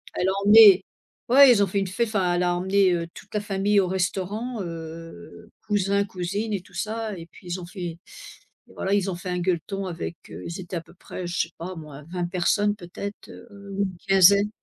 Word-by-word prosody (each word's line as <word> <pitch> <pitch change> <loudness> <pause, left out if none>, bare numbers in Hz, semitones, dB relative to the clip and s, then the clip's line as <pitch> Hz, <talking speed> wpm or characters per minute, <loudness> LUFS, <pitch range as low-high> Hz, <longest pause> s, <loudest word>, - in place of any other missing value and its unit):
elle 180 - 0
a - - +3
emmené 205 -2 +8 0.5
ouais 275 +1 +8
ils 210 -4 +5
ont - - +1
fait 200 +2 -1
une 195 - -1
fê 230 +6 -1
enfin 195 -5 0
elle 175 - +1
a 175 0 +1
emmené, 190 +1 +3
heu, 170 -1 -2
toute - - -14
la 210 - +1
famille 205 0 +1
au 185 - +2
restaurant 195 +5 -2
heu 165 +5 -9 0.2
cousins, 200 -1 +1
cousines 200 +3 -4
et 195 - -2
tout 185 - -21
ça, 215 +2 -4
et 165 - -9
puis 180 - -16
ils 175 +1 -4
ont - - -8
fait 185 +2 -11
et 170 -1 -5 0.8
voilà 195 +1 -1
ils 200 -1 +1
ont - - -4
fait 180 +1 -7
un 180 0 -1
gueuleton 185 +2 -2
avec, 170 -1 -5
heu - - -9
ils 170 +2 -6
étaient 175 0 -7
à - - -4
peu 165 - -19
près 180 0 -8
je 175 - -3
sais 165 - -4
pas 180 +3 -6
moi 150 -3 -10
20 175 -1 -2
personnes 205 +4 +1
peut-être, 200 +2 -8
heu, 200 -3 -12
ou 200 - 0
une 190 -3 -4
quinzaine. 200 +2 +6
190 Hz, 225 wpm, -24 LUFS, 175-205 Hz, 0.8 s, emmené